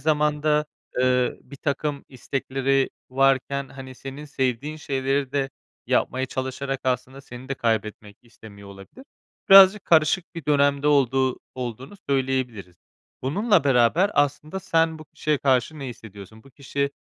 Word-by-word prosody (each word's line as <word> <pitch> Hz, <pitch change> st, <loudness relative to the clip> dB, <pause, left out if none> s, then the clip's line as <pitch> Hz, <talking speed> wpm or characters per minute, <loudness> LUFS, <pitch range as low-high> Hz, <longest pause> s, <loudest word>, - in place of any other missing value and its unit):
zamanda, 150 Hz, 0 st, +1 dB, 0.3 s
eee, 125 Hz, -1 st, +2 dB
birtakım 140 Hz, +1 st, -4 dB
istekleri 135 Hz, +1 st, -1 dB, 0.2 s
varken, 135 Hz, +1 st, +1 dB
hani, 130 Hz, -1 st, -10 dB
senin 135 Hz, +3 st, -9 dB
sevdiğin 135 Hz, +1 st, -2 dB
şeyleri 135 Hz, -2 st, -2 dB
de 140 Hz, -1 st, -1 dB, 0.4 s
yapmaya 130 Hz, +1 st, 0 dB
çalışarak 130 Hz, +1 st, -4 dB
aslında 130 Hz, +1 st, -2 dB
seni 125 Hz, 0 st, -11 dB
de 135 Hz, -, -2 dB
kaybetmek 110 Hz, -4 st, -2 dB
istemiyor 105 Hz, -4 st, -14 dB
olabilir. 100 Hz, -, -13 dB, 0.4 s
Birazcık 195 Hz, +1 st, +8 dB
karışık 165 Hz, +3 st, +2 dB
bir 165 Hz, -, -7 dB
dönemde 140 Hz, 0 st, +2 dB
olduğu 135 Hz, -2 st, +2 dB, 0.2 s
olduğunu 125 Hz, -, -6 dB
söyleyebiliriz. 130 Hz, -9 st, -2 dB, 0.5 s
Bununla 195 Hz, -, +2 dB
beraber 140 Hz, -, +3 dB
aslında 150 Hz, +6 st, 0 dB
sen 165 Hz, -3 st, +1 dB
bu 155 Hz, -, -11 dB
kişiye 150 Hz, 0 st, -2 dB
karşı 135 Hz, +3 st, +1 dB
ne 140 Hz, -, -6 dB
hissediyorsun? 110 Hz, -2 st, -12 dB
Bu 135 Hz, -, -17 dB
kişi, 140 Hz, +1 st, -3 dB
135 Hz, 125 wpm, -24 LUFS, 125-150 Hz, 0.5 s, Birazcık